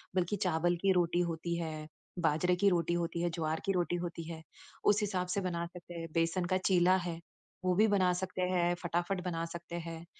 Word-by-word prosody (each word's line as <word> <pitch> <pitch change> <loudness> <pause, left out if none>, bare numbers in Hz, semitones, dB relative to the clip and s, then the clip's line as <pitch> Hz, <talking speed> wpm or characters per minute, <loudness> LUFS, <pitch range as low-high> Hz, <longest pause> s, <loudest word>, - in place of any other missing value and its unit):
बल्कि 185 +3 +1
चावल 175 +1 +2
की 195 -1 +4
रोटी 175 -1 +2
होती 170 +1 -3
है, 155 -2 -4 0.3
बाजरे 175 +2 +2
की 200 +2 +4
रोटी 170 -1 +1
होती 170 0 -1
है, 175 - +1
ज्वार 160 -1 -1
की 195 - +2
रोटी 175 -1 +1
होती 170 -1 -4
है, 160 0 -7 0.4
उस 210 +1 +5
हिसाब 185 -3 -1
से 200 - +1
बना 170 -2 -2
सकते 175 0 -10
हैं। 165 -1 -5
बेसन 165 +2 +1
का 185 +1 +2
चीला 185 0 +5
है, 175 -2 -4 0.5
वो 180 - +3
भी 215 +3 +5
बना 190 -3 +3
सकते 185 0 -3
हैं, 175 -1 +2
फटाफट 175 +2 -1
बना 165 -2 -1
सकते 170 0 -7
हैं। 165 0 -7
175 Hz, 205 wpm, -33 LUFS, 165-185 Hz, 0.5 s, उस